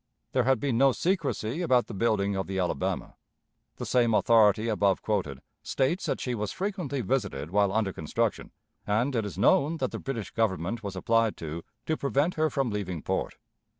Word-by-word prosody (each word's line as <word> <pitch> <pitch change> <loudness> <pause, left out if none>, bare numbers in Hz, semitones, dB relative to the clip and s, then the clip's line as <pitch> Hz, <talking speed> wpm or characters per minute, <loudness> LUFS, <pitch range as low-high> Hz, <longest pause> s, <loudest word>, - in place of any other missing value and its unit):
There - - +2
had 130 -2 +3
been 130 -3 0
no 135 -1 +5
secrecy 165 - -1
about 130 -8 +3
the - - -9
building 100 -2 +1
of 95 - -2
the 95 0 -3
Alabama. 90 -7 -2 0.6
The - - -6
same 120 -3 +3
authority 110 -1 +4
above 100 -4 +1
quoted 90 -11 -2 0.2
states 150 +8 0
that - - -1
she 125 - -2
was 105 -3 -2
frequently 180 -9 -3
visited 100 - -2
while 100 0 +3
under 105 -2 0
construction, 75 - -2 0.4
and 120 +6 +1
it 110 -3 0
is 95 - -8
known 145 - +3
that - - -2
the - - -5
British 120 -7 -4
Government 110 0 -1
was 100 -3 -5
applied 115 +3 +1
to 80 +1 -6 0.2
to 160 - 0
prevent 140 +5 +1
her 155 0 +1
from 135 -5 -1
leaving 95 -6 -4
port. - - -2
110 Hz, 185 wpm, -28 LUFS, 100-135 Hz, 0.6 s, no